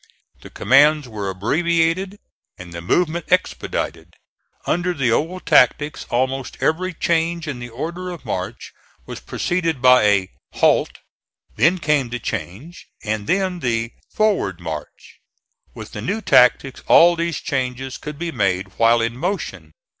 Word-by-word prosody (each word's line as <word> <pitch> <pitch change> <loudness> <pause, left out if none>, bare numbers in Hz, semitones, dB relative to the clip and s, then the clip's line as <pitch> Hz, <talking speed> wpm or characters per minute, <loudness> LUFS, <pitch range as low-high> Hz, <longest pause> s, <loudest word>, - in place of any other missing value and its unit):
The - - -12
commands 145 +2 +3
were 105 -4 -5
abbreviated 165 - 0 0.4
and 90 -2 -11
the 85 - -6
movement 170 - -1
expedited. 85 - -2 0.5
Under 175 +1 0
the 130 -6 +1
old 170 +9 -1
tactics 145 +4 +3
almost 130 +2 -2
every 185 +4 0
change 165 -1 -1
in 140 -5 -4
the 120 0 -7
order 170 +9 -5
of 175 -3 -9
march 95 +5 -5 0.3
was - - -8
preceded 165 -5 -2
by 125 -2 +6
a 100 -2 +2 0.2
"halt," - - +2 0.6
then 175 +3 +3
came 150 -6 0
the 125 - -3
change, 125 - -7 0.2
and 105 -1 -3
then 185 -2 0
the 115 -4 -1 0.2
"forward 200 - 0
march." 80 -3 -8 0.6
With - - -9
the - - -7
new 205 +4 -2
tactics 130 - +3
all 175 +1 +7
these 170 -2 -2
changes 130 -1 -3
could 150 -1 -7
be 170 +1 -4
made 95 - -1
while 115 0 +4
in 115 +1 -2
motion. 125 - -4
135 Hz, 140 wpm, -20 LUFS, 115-170 Hz, 0.6 s, all